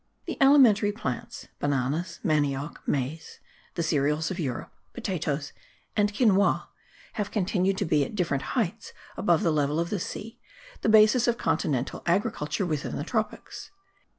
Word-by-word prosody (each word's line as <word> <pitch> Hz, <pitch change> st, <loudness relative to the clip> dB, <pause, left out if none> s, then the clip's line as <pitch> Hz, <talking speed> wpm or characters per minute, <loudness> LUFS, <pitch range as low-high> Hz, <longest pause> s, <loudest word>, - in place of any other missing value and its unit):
The -, -, -5 dB
alimentary 245 Hz, -7 st, +6 dB
plants, 170 Hz, -, -5 dB
bananas, 145 Hz, +5 st, -1 dB
manioc, 145 Hz, -2 st, 0 dB
maize, 145 Hz, +4 st, -3 dB, 0.4 s
the 170 Hz, -, -1 dB
cereals 150 Hz, +1 st, +1 dB
of 185 Hz, -, -4 dB
Europe, 130 Hz, -7 st, -4 dB, 0.2 s
potatoes 155 Hz, -, -3 dB, 0.4 s
and 205 Hz, -1 st, +2 dB
quinoa, 205 Hz, -3 st, +2 dB, 0.4 s
have 205 Hz, -2 st, -2 dB
continued 190 Hz, -1 st, 0 dB
to 200 Hz, -, 0 dB
be, 150 Hz, -3 st, +2 dB
at 140 Hz, -, -6 dB
different 165 Hz, -, -1 dB
heights 220 Hz, 0 st, -2 dB, 0.2 s
above 175 Hz, 0 st, +2 dB
the 165 Hz, -4 st, +2 dB
level 150 Hz, +1 st, +1 dB
of 170 Hz, 0 st, -2 dB
the 205 Hz, -, -1 dB
sea, 220 Hz, +5 st, -6 dB, 0.4 s
the -, -, +1 dB
basis 220 Hz, +3 st, +6 dB
of 240 Hz, -1 st, +2 dB
continental 130 Hz, -4 st, -1 dB
agriculture 175 Hz, -1 st, 0 dB
within 155 Hz, -5 st, -3 dB
the -, -, -3 dB
tropics. 220 Hz, +5 st, -4 dB
175 Hz, 145 wpm, -27 LUFS, 150-210 Hz, 0.4 s, alimentary